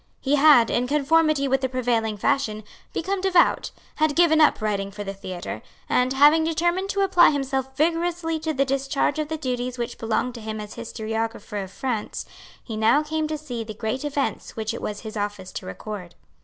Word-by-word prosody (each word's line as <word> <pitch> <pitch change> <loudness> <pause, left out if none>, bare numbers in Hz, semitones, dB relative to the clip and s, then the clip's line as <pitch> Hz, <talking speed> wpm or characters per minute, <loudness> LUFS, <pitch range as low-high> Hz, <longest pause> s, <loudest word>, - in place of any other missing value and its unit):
He 275 - -1
had, 285 -5 +6
in 245 +1 +1
conformity 300 0 +2
with 270 0 +1
the 260 - 0
prevailing 235 -4 0
fashion, 215 -1 0 0.3
become 380 +3 -2
devout, 370 -2 +3 0.3
had 310 -1 +2
given 330 -2 +5
up 305 - +5
writing 200 -2 -1
for 205 +1 -7
the 195 -1 -5
theatre; 185 -2 -6 0.3
and, 250 +1 +2
having 295 +4 +6
determined 345 +4 0
to 400 - 0
apply 375 -3 +6
himself 265 -2 -2
vigorously 330 +1 0
to 315 0 -2
the 275 -2 +1
discharge 275 +2 0
of 305 - -1
the 315 +1 -3
duties 250 -3 -3
which 240 -1 -4
belonged 230 +2 -1
to 235 - -9
him 215 0 -5
as 210 0 -7
historiographer 225 -2 -4
of 190 - -10
France, 230 -1 -3 0.4
he 225 - -6
now 220 +8 +3
came 310 0 -2
to 310 0 -3
see 250 -6 -5
the 215 -1 -8
great 220 +5 -3
events 290 -1 -2
which 220 0 -3
it - - -6
was 210 0 -4
his 220 -1 -8
office 205 -3 -4
to - - -7
record. 180 - -7
260 Hz, 195 wpm, -24 LUFS, 220-310 Hz, 0.4 s, had